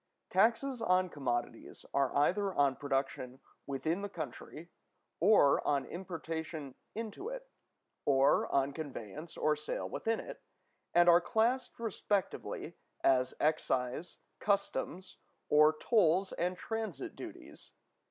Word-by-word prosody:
Taxes 240 Hz, +2 st, +2 dB
on 185 Hz, -3 st, +3 dB
commodities 120 Hz, -6 st, -4 dB
are 140 Hz, -2 st, +2 dB
either 190 Hz, +7 st, +2 dB
on 140 Hz, -2 st, +3 dB
production 135 Hz, -2 st, -2 dB, 0.3 s
within 155 Hz, +7 st, -1 dB
the 205 Hz, -, -4 dB
country, 165 Hz, -1 st, -7 dB, 0.5 s
or 180 Hz, -7 st, +5 dB
on 140 Hz, -1 st, +1 dB
importation 160 Hz, -5 st, -5 dB, 0.2 s
into 225 Hz, -, -5 dB
it, -, -, -7 dB, 0.6 s
or 140 Hz, 0 st, +3 dB
on 140 Hz, 0 st, +2 dB
conveyance 150 Hz, -, -7 dB
or 155 Hz, 0 st, +2 dB
sale 150 Hz, +1 st, -4 dB
within 225 Hz, 0 st, -1 dB
it, -, -, -8 dB, 0.5 s
and 175 Hz, 0 st, +6 dB
are 175 Hz, 0 st, +7 dB
classed 245 Hz, +6 st, +1 dB
respectively 210 Hz, -3 st, -2 dB, 0.3 s
as 130 Hz, -1 st, +3 dB
excise, 140 Hz, -1 st, 0 dB, 0.2 s
customs, 200 Hz, -2 st, -1 dB, 0.3 s
or 150 Hz, +1 st, +7 dB
tolls 190 Hz, -4 st, +3 dB
and 180 Hz, +1 st, -1 dB
transit 220 Hz, -10 st, -4 dB
duties. -, -, -10 dB
165 Hz, 115 wpm, -33 LUFS, 140-200 Hz, 0.6 s, are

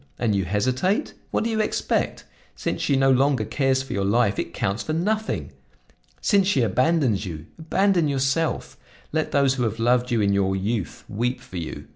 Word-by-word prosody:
And 115 Hz, -3 st, +1 dB
you 100 Hz, -2 st, 0 dB
hesitate? 130 Hz, -, 0 dB, 0.2 s
What -, -, 0 dB
do 230 Hz, -, -1 dB
you 220 Hz, -1 st, +1 dB
expect? 215 Hz, -, -1 dB, 0.3 s
Since -, -, -3 dB
she 140 Hz, -, +2 dB
no 135 Hz, 0 st, +4 dB
longer 130 Hz, -3 st, +2 dB
cares 130 Hz, +3 st, +1 dB
for 135 Hz, -, -6 dB
your 100 Hz, -, -1 dB
life, 100 Hz, 0 st, +2 dB
it -, -, -3 dB
counts 100 Hz, +5 st, -2 dB
for 155 Hz, -, -3 dB
nothing! 215 Hz, +7 st, -1 dB, 0.7 s
Since 200 Hz, -3 st, +3 dB
she 140 Hz, -11 st, +3 dB
abandons 125 Hz, -, +2 dB
you, 80 Hz, -2 st, -7 dB
abandon 175 Hz, +1 st, +2 dB
yourself! 140 Hz, +3 st, -1 dB, 0.3 s
Let 155 Hz, 0 st, 0 dB
those 140 Hz, -2 st, +3 dB
who 130 Hz, -2 st, -1 dB
have 110 Hz, -1 st, -1 dB
loved 120 Hz, +2 st, +2 dB
you 120 Hz, -3 st, +1 dB
in 100 Hz, -1 st, +2 dB
your 95 Hz, -1 st, +1 dB
youth 100 Hz, 0 st, -3 dB
weep 120 Hz, +5 st, -2 dB
for 125 Hz, -7 st, -10 dB
you! 80 Hz, -2 st, -6 dB
125 Hz, 185 wpm, -24 LUFS, 105-155 Hz, 0.7 s, no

